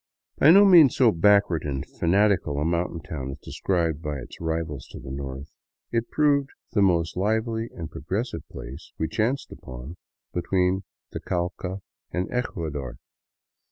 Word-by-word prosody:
By 145 - +7
no 200 +5 +9
means 170 -9 +7
so 125 -4 +5
backward 100 -2 +4
and 70 -2 -3
fanatical 95 -4 +1
a 75 - 0
mountain 85 0 -1
town 70 -3 -5
as 70 - -6
described 85 -2 -1
by 75 -2 -3
its 65 - -10
rivals 80 -4 -3
to - - -10
the 65 - -8
north, 70 +1 -6 0.4
jit 115 0 -1
proved 145 -2 +2 0.2
the 105 - +2
most 85 -4 +2
lively 110 +3 0
and 80 - -5
progressive 95 - -3
place 70 +7 -9
we 80 - 0
chanced 115 - -1
upon 65 +7 -9 0.4
be 90 - -1
(tween 95 +1 +1 0.3
the - - -4
Cauca 90 +2 -3 0.3
and 90 +1 -2
Ecuador. 75 - -3
85 Hz, 155 wpm, -25 LUFS, 75-105 Hz, 0.4 s, no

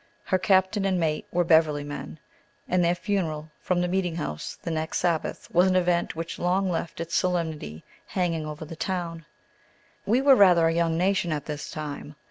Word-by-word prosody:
Her 185 - +1
captain 190 +2 +2
and 190 -2 +1
mate 155 -2 -1
were 175 0 +2
Beverly 160 -3 +3
men, 145 +2 -7 0.5
and 180 -1 +2
their 170 +1 +2
funeral 165 -6 -2
from 180 -1 0
the 180 - +1
meeting 180 -2 -1
house 75 - -5
the 170 - -3
next 160 0 -2
Sabbath 170 -3 -1
was 180 +2 +5
an 185 - +2
event 175 -2 +1
which 165 +1 -5
long 185 +2 +1
left 165 -1 -4
its 170 0 -5
solemnity 160 - -1 0.2
hanging 165 -4 -1
over 150 +1 -6
the 165 - -8
town. 165 -2 -4 0.8
We 230 +5 +3
were 270 0 +6
rather 180 -6 +6
a 165 - +1
young 165 -1 +1
nation 185 -1 +1
at 150 -2 -2
this 150 -1 -5
time. 150 -1 -6
170 Hz, 185 wpm, -26 LUFS, 160-185 Hz, 0.8 s, were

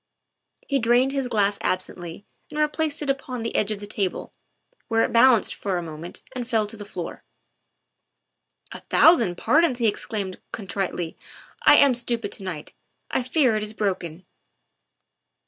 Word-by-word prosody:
He 280 -1 +1
drained 240 +3 +3
his 270 -2 -1
glass 205 -3 +1
absently 180 0 -3 0.2
and 300 - -7
replaced 300 0 0
it 285 - -4
upon 255 -3 -5
the 230 - -4
edge 210 - +2
of 215 -2 -2
the 205 - -7
table, 200 -2 -3 0.5
where 225 0 +2
it - - -1
balanced 235 -1 +5
for 195 -3 -2
a 175 - -3
moment 160 +1 -8
and 245 -2 -4
fell 225 -3 +1
to 210 - -8
the 205 -1 -8
floor. 200 - -7 1.5
"A - - -7
thousand 230 - +4
pardons!" 295 +1 +3
he 240 - 0
exclaimed 200 -3 -2
contritely. 190 -4 -3 0.2
" - - -19
I - - +10
am 280 -2 +6
stupid 235 -3 -3
to - - -7
night; 170 -5 -6 0.4
I - - +1
fear 255 -2 +2
it 215 - 0
is 210 0 -4
broken. 185 -5 -3
220 Hz, 165 wpm, -24 LUFS, 195-255 Hz, 1.5 s, I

